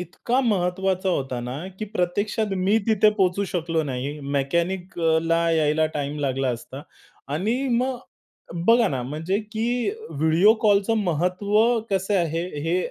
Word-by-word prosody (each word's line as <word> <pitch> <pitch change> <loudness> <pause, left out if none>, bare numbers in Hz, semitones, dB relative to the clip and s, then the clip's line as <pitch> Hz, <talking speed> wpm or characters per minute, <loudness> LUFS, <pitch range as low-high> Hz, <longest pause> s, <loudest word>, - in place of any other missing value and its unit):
इतका 210 +8 -1
महत्वाचा 190 -4 0
होता 135 -8 -1
ना, 125 +2 -5 0.2
की 215 - -3
प्रत्यक्षात 205 +1 -1
मी 200 +4 +3
तिथे 215 -1 +4
पोहचू 190 +1 +2
शकलो 165 -3 -1
नाही. 140 +2 -4 0.2
मेकॅनिकला 165 +1 0
यायला 155 -1 +2
टाईम 145 +1 -3
लागला 135 -1 0
असता. 125 +3 -5 0.5
आणि 185 - 0 0.2
मग 250 +2 0 0.7
बघा 230 -1 +5
ना, 130 -6 -2
म्हणजे 155 +9 -2
की 235 - 0 0.2
व्हिडिओ 160 +8 +4
कॉलचं 205 0 +3
महत्व 180 +4 -1 0.4
कसं 195 +1 0
आहे 165 +1 -1 0.2
हे 165 +3 0
175 Hz, 130 wpm, -24 LUFS, 155-205 Hz, 0.7 s, बघा